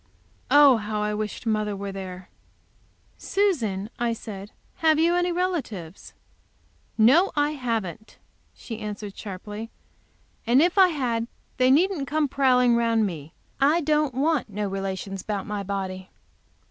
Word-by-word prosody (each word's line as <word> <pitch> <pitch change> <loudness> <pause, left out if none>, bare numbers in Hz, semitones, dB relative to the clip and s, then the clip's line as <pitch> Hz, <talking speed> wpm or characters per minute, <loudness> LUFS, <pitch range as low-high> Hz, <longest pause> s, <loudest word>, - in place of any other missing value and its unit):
Oh, 285 -4 +7
how 210 0 -3
I 210 0 -1
wished 210 +2 -4
mother 215 -2 0
were 200 0 -5
there! 185 -1 -8 0.9
"Susan," 235 - 0
I 235 -1 +1
said, 205 -3 -8 0.3
"have 315 -1 +3
you 335 +2 +3
any 355 0 +1
relatives?" 285 - -4 0.8
"No, 275 - +5
I 295 0 +2
haven't," 225 - -4 0.4
she 225 -2 -8
answered 210 -2 -6
sharply. 210 +3 -7 0.8
"And 245 +3 +5
if 355 +5 +3
I 380 - +8
had 245 -8 -1 0.3
they 255 0 +4
needn't 310 +1 +2
come 305 0 +1
prowling 250 -3 +3
around 230 -2 +2
me. 160 -5 -6 0.3
I 295 +5 +3
don't 300 -3 +1
want 290 -2 +1
no 205 0 -3
relations 195 0 -4
about 205 -1 -4
my 210 -2 -3
body." 190 -1 -4
230 Hz, 135 wpm, -25 LUFS, 200-290 Hz, 0.9 s, I